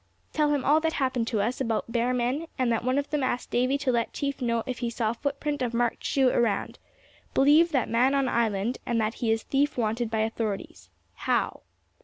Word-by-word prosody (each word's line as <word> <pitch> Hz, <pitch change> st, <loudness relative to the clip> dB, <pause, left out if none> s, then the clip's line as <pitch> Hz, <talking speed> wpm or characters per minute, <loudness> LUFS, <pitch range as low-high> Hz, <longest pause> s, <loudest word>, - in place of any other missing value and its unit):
Tell 300 Hz, -1 st, +2 dB
him 285 Hz, -3 st, 0 dB
all 300 Hz, +2 st, +5 dB
that 320 Hz, 0 st, -1 dB
happened 255 Hz, -4 st, 0 dB
to 220 Hz, -4 st, 0 dB
us, 240 Hz, +6 st, -1 dB
about 230 Hz, -2 st, -1 dB
bear 240 Hz, +1 st, +1 dB
men, 255 Hz, +6 st, -1 dB
and 255 Hz, -2 st, +1 dB
that 230 Hz, -, 0 dB
one 255 Hz, +2 st, +1 dB
of 285 Hz, +1 st, -2 dB
them 300 Hz, -2 st, 0 dB
asked 255 Hz, -1 st, -2 dB
Davy 255 Hz, +3 st, +2 dB
to 280 Hz, -2 st, 0 dB
let 235 Hz, -1 st, -1 dB
chief 280 Hz, -2 st, -3 dB
know 235 Hz, -2 st, 0 dB
if 255 Hz, -2 st, -4 dB
he 240 Hz, -, -1 dB
saw 225 Hz, -1 st, -1 dB
footprint 285 Hz, +3 st, -3 dB
of 240 Hz, -2 st, -1 dB
marked 240 Hz, 0 st, 0 dB
shoe 265 Hz, -2 st, +3 dB
around. 230 Hz, -5 st, 0 dB, 0.6 s
Believe 305 Hz, +5 st, +5 dB
that 265 Hz, -5 st, +1 dB
man 250 Hz, +4 st, +2 dB
on 275 Hz, -1 st, +2 dB
island, 230 Hz, -1 st, 0 dB
and 235 Hz, -1 st, 0 dB
that 220 Hz, 0 st, 0 dB
he 230 Hz, -2 st, +2 dB
is 225 Hz, 0 st, 0 dB
thief 280 Hz, +1 st, 0 dB
wanted 225 Hz, 0 st, 0 dB
by 220 Hz, -1 st, 0 dB
authorities. 220 Hz, -2 st, -4 dB, 0.2 s
How?" -, -, -1 dB
245 Hz, 215 wpm, -27 LUFS, 230-275 Hz, 0.6 s, all